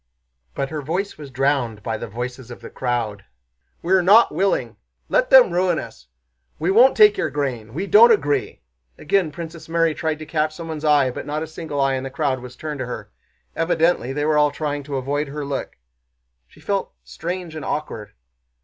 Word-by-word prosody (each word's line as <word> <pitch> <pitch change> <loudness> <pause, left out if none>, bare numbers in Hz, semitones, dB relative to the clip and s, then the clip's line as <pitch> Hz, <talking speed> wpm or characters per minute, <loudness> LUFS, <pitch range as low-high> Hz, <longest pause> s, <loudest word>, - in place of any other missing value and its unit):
But 135 -1 -3
her 155 -1 -3
voice 180 +8 -3
was 145 -2 -9
drowned 130 -5 -1
by 110 - -2
the 115 - -6
voices 125 +3 -6
of 120 - -10
the - - -10
crowd. 115 -6 -2 0.6
"We're 185 +2 +3
not 205 +6 +5
willing. 195 +1 0 0.3
Let - - +2
them - - +7
ruin 180 -1 +1
us! - - -8 0.5
We 170 +4 0
won't 245 +6 +5
take 210 -1 +7
your - - 0
grain. 125 -6 -4
We 185 +5 -2
don't 225 +4 +7
agree." 145 - 0 0.3
Again 180 0 0
Princess 160 0 -9
Mary 165 -1 +2
tried 160 -1 -2
to 155 - -9
catch 155 0 -1
someone's 160 -2 -6
eye, 145 -4 +3
but 130 - -7
not 150 +2 -2
a - - -3
single 155 -2 -6
eye 135 0 +2
in 130 0 -2
the 135 - -5
crowd 135 -2 -1
was 125 0 -10
turned 150 -1 -6
to 130 - -3
her; 105 -4 -7 0.4
evidently 165 -5 +1
they 145 +2 -2
were 155 -1 +3
all 150 0 +4
trying 145 -1 -3
to 140 -1 -5
avoid 145 +3 -2
her 145 +1 -5
look. 140 -1 -5 0.7
She - - -20
felt 200 -1 -2
strange 175 -1 -6
and 155 - -6
awkward. 115 -8 -4
150 Hz, 195 wpm, -21 LUFS, 130-170 Hz, 0.7 s, them